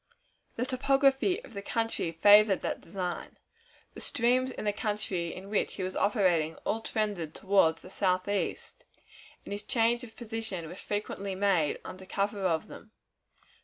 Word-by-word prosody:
The 245 - -1
topography 275 - +2
of - - -13
the 200 - -5
country 225 -5 -1
favored 205 +3 +6
that - - -2
design. 180 0 -5 0.6
The - - -9
streams 250 +2 +2
in 250 - -6
the 205 - +1
country 200 -5 -2
in 190 +1 -9
which 210 - 0
he 190 - -4
was 185 0 -3
operating 175 -7 +2
all 225 - 0
trended 205 -8 -2
toward 190 -5 +3
the 180 +3 -13
southeast, 190 +1 -1 0.6
and - - -8
his 205 0 -3
change 230 +2 +1
of 225 -2 -11
position 220 -7 -5
was 180 - -8
frequently 200 -2 -3
made 185 -6 +2
under 185 0 -9
cover 200 +1 -1
of 160 -2 0
them. - - -12
205 Hz, 155 wpm, -30 LUFS, 185-225 Hz, 0.6 s, favored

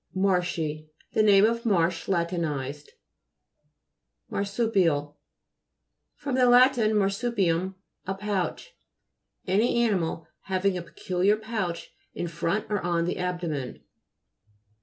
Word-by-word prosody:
MA'RSHII 175 -5 0 0.2
The 220 - +3
name 205 -1 +6
of 230 +1 0
Marsh 170 -6 +1
la 175 -3 +2
tinized. 150 -5 -4 1.4
MAHSU'PIAL 195 -8 0 1.0
fr. 290 -1 -5
lat. 250 0 +6
marsupium, 195 -4 +1 0.3
a 190 - -1
pouch. 205 - -3 0.7
Any 230 +5 +2
animal 170 -7 -1 0.2
having 190 0 0
a 180 - -3
pe 170 - -15
culiar 190 +4 +1
pouch 215 -6 -4 0.2
in 175 - -3
front 170 +6 -1
or 205 - 0
on 170 -1 0
the 180 - -2
ab 180 -1 -2
domen. 150 -7 -4
185 Hz, 110 wpm, -26 LUFS, 170-215 Hz, 1.4 s, name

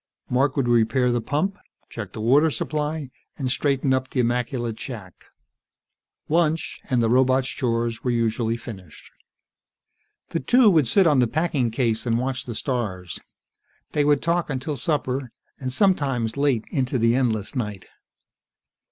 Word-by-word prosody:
Mark 130 +3 +2
would 135 -3 +1
repair 120 +2 +3
the 120 -1 0
pump, 190 - -1 0.3
check 110 -5 -7
the 110 - -7
water 140 +8 +4
supply, 150 -2 -3 0.3
and 130 -3 -1
straighten 135 0 +1
up 130 0 -1
the 130 - -2
immaculate 120 -1 -1
shack. 105 -9 -9 1.0
Lunch, 160 0 0
and 125 -2 +2
the - - +3
robot's 130 +2 +3
chores 115 -2 -1
were 125 - 0
usually 115 -1 0
finished. 95 -9 -11 1.2
The 165 - -1
two 245 0 +5
would 155 -7 +3
sit 190 - +4
on 150 -5 +4
the 125 - +4
packing 150 -3 0
case 115 -1 0
and 115 -1 +2
watch 130 +1 -2
the 120 - -6
stars. 100 - -3 0.7
They 150 - +1
would 145 -1 +2
talk 170 0 0
until 145 +2 -3
supper, 135 -5 -1 0.3
and 130 -1 -3
sometimes 135 - +1
late 140 -5 +1
into 130 -1 0
the 115 0 +3
endless 120 -2 0
night. 105 -6 -4
130 Hz, 150 wpm, -24 LUFS, 115-145 Hz, 1.2 s, two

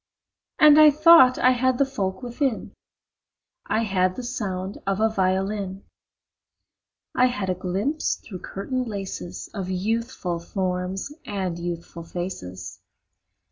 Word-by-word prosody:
And 300 0 +7
I 305 0 +9
thought 300 -4 +7
I 255 - +4
had 255 0 +1
the 275 - +3
folk 195 -5 -3
within: 245 0 -2 0.9
I 225 - +1
had 185 -3 +1
the 255 - -6
sound 195 -4 -4
of 195 0 0
a 220 - +4
violin; 195 0 -1 1.3
I 250 - +4
had 205 -7 -2
a - - +1
glimpse 195 - -1
through 185 -4 -10
curtain 250 +9 -4
laces 195 -4 -6
Of 195 -4 -4
youthful 195 -2 -2
forms 185 +6 -3
and 190 -4 -3
youthful 170 0 -6
faces. 165 - -7
195 Hz, 125 wpm, -24 LUFS, 185-250 Hz, 1.3 s, I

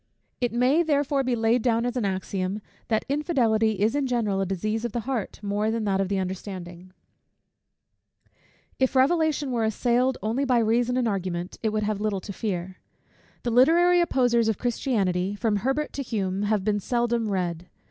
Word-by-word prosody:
It 245 -1 0
may 250 +7 +3
therefore 285 -3 +1
be 255 -1 0
laid 230 +1 +2
down 230 0 +1
as 245 0 -2
an 245 -4 0
axiom, 190 +1 -2 0.3
that 220 -2 0
infidelity 245 -7 +1
is 210 +2 +1
in 285 -2 0
general 215 -6 0
a 195 - -1
disease 215 +4 -2
of 240 -3 -3
the 240 - -1
heart 245 -3 -4
more 205 +2 0
than 220 -1 -1
of 195 -1 +1
the 200 - 0
understanding. 185 -1 -6 1.9
If 260 +1 +1
Revelation 295 0 +2
were 235 -2 0
assailed 245 +4 +1
only 230 +6 0
by 255 -3 +2
reason 235 +2 +2
and 250 -2 +1
argument, 185 -3 -3
it 220 - +1
would 215 0 -1
have 210 -1 -2
little 210 -3 -1
to 200 - -7
fear. 185 -3 -4 0.7
The 240 - -1
literary 345 +8 +5
opposers 245 -8 +2
of 220 - +1
Christianity, 200 -6 0
from 210 -1 0
Herbert 270 +8 -1
to 280 - -3
Hume, 195 -6 -2
have 210 -3 +1
been 205 0 +1
seldom 235 0 0
read. 175 -3 -2
225 Hz, 175 wpm, -25 LUFS, 200-250 Hz, 1.9 s, literary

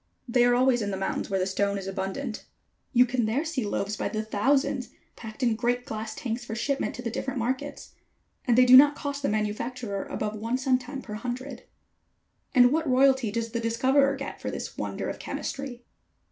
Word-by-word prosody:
They 240 0 +3
are 245 0 +4
always 250 -1 +3
in 205 - -1
the 195 - -2
mountains 195 - -2
where 195 -1 0
the 185 - +1
stone 200 +1 0
is 195 - -5
abundant. 195 +6 -4 0.5
You 250 -1 +6
can 240 -2 0
there 265 +9 0
see 310 -6 -2
loaves 205 0 -2
by - - -2
the 215 0 -2
thousands 260 +4 +1 0.3
packed 220 +2 -8
in 235 -3 +3
great 245 +2 0
glass 220 0 -5
tanks 240 -1 -3
for 225 -2 -5
shipment 275 +4 -1
to 250 - -7
the 230 - -2
different 265 +3 -3
markets. 260 +4 -3 0.5
And 240 -2 +3
they 255 - +7
do 250 +1 +8
not 290 +2 +8
cost 285 -1 -4
the 275 - 0
manufacturer 215 0 -2
above 215 0 -3
one 230 +4 -1
centime 260 +1 -1
per 210 - -8
hundred." 245 +3 -5 0.9
"And 245 -1 +7
what 320 0 0
royalty 265 -2 +4
does 230 +2 -3
the 235 - -2
discoverer 265 +5 +2
get 275 0 -7
for - - -3
this - - -6
wonder - - -4
of - - -5
chemistry?" 265 -3 -5
245 Hz, 200 wpm, -27 LUFS, 220-265 Hz, 0.9 s, do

